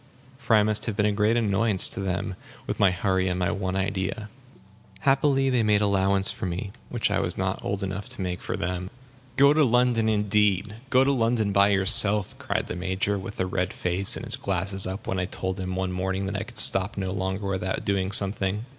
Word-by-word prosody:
For 120 -5 +2
I 105 - +5
must 110 +1 0
have 110 - -2
been 105 -1 +1
a 105 - +2
great 105 +3 +1
annoyance 105 -2 +4
to - - -3
them, 95 0 -3 0.3
with - - -4
my 100 - +5
hurry 95 0 -1
and 90 0 -1
my 90 -1 0
one 95 -1 -3
idea. 95 +2 -3 0.7
Happily 135 -1 +2
they 125 -2 +2
made 105 -1 +2
allowance 100 -1 +1
for - - -5
me, 90 +3 -5 0.2
which - - -1
I - - +1
was - - -3
not - - -3
old 100 0 -3
enough 95 +1 -5
to - - -3
make 90 -1 -4
for - - -4
them. 90 +1 -4 0.5
"Go 140 +2 +6
to 155 0 +3
London, 120 -3 +2
indeed! 105 -1 +1
Go 130 0 +4
to 140 - +2
London 115 -4 0
by 100 0 +4
yourself!" 100 +1 +3
cried - - -2
the - - -6
Major, 95 +2 -2
with 95 +2 -9
a 95 - +1
red 90 0 -2
face, 90 +2 +3
and - - -7
his - - -1
glasses 95 0 -1
up, 95 +2 -6
when 95 - -2
I 90 - -1
told 95 0 -5
him 95 0 -4
one 95 0 -2
morning 95 +1 -3
that 100 +1 -4
I 100 +2 -3
could 120 +1 -13
stop 95 +2 +4
no 95 -1 -3
longer 95 +1 -3
without 95 -1 -3
doing 95 -1 -1
something. 100 +1 +2
100 Hz, 215 wpm, -25 LUFS, 95-105 Hz, 0.7 s, Go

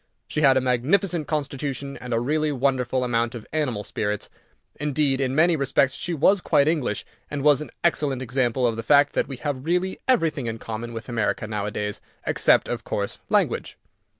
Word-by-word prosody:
She 150 - -2
had 135 -3 +6
a - - +3
magnificent 150 - +1
constitution, 140 -2 -3
and 125 - -8
a 115 - +2
really 150 +5 0
wonderful 130 -2 0
amount 120 -1 0
of 115 - -8
animal 130 -9 -1
spirits. 105 0 -3 0.5
Indeed, 145 -2 +1
in 130 0 0
many 170 +3 +4
respects, 135 -2 +2
she 175 -1 -3
was 185 +6 +4
quite 145 -4 +3
English, 150 -10 0 0.2
and 145 -1 -3
was 145 -1 +5
an 150 - -6
excellent 150 -6 +1
example 125 0 0
of 115 -2 +1
the - - -2
fact 145 +5 +4
that - - 0
we 135 - -6
have 130 +1 -3
really 180 +4 0
everything 160 - +2
in 115 0 -3
common 115 +1 -6
with 115 0 -7
America 115 -3 -1
nowadays, 105 -1 -3 0.2
except, - - +3
of - - -3
course, - - -3
language. - - +1
135 Hz, 180 wpm, -24 LUFS, 120-150 Hz, 0.5 s, had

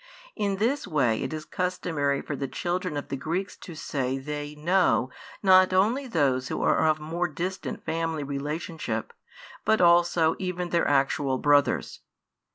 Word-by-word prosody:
In 200 -2 0
this 235 +6 0
way 130 - +1
it - - -3
is 155 -1 -5
customary 160 -6 -1
for 145 - -4
the 140 0 -3
children 175 +1 -2
of 145 - -5
the 135 - -2
Greeks 175 +8 -3
to 170 - -10
say 135 -4 -2
they 145 +2 -5
"know" 155 -5 +2 0.3
not 185 -1 +6
only 230 +9 +2
those 135 - +1
who - - -3
are 160 - +3
of 155 0 +2
more 165 +3 -2
distant 180 +5 -5
family 165 -2 -2
relationship, 150 - -4 0.5
but 220 - +3
also, 170 -2 +4
even 180 -2 -3
their 170 - +2
actual 135 -1 +1
brothers. 145 +1 +2
160 Hz, 155 wpm, -26 LUFS, 145-180 Hz, 0.5 s, not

